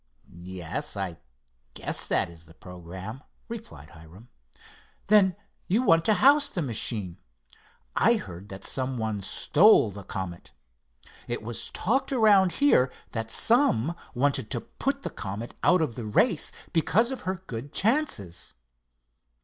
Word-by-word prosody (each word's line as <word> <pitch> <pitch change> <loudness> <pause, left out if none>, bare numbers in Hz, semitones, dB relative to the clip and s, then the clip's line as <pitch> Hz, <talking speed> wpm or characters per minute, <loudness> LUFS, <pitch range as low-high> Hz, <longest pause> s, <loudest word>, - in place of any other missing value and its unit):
"Yes, 90 0 -5
I 95 -4 -4 0.6
guess - - -1
that - - +2
is 85 -1 -13
the 80 +1 -18
programme," 90 - -9 0.3
replied 230 - -9
Hiram. 85 +9 -15 0.8
"Then 195 -4 +5 0.3
you 220 +7 +2
want 165 -8 +4
to 215 - +4
house 285 +7 +5
the 175 - -3
machine. 110 -7 -2 0.8
I - - +4
heard 90 +4 -8
that 95 0 -9
some 130 -1 -2
one 110 -3 -2
stole 150 - +4
the 100 +1 -9
Comet. 90 -2 -7 0.7
It 120 -1 -4
was 115 +1 -4
talked 250 +10 0
around 205 -7 +4
here 130 - +3 0.2
that 115 -1 -4
some 170 - +3 0.2
wanted 130 -3 +1
to - - -2
put 275 +4 -3
the - - -4
Comet 105 +3 -6
out 180 -2 +4
of 140 -7 -2
the 115 0 -6
race 105 - +2 0.2
because 220 +9 +2
of 265 - -5
her 185 +1 -2
good 125 +2 -7
chances." 205 - 0
125 Hz, 140 wpm, -27 LUFS, -, 0.8 s, Then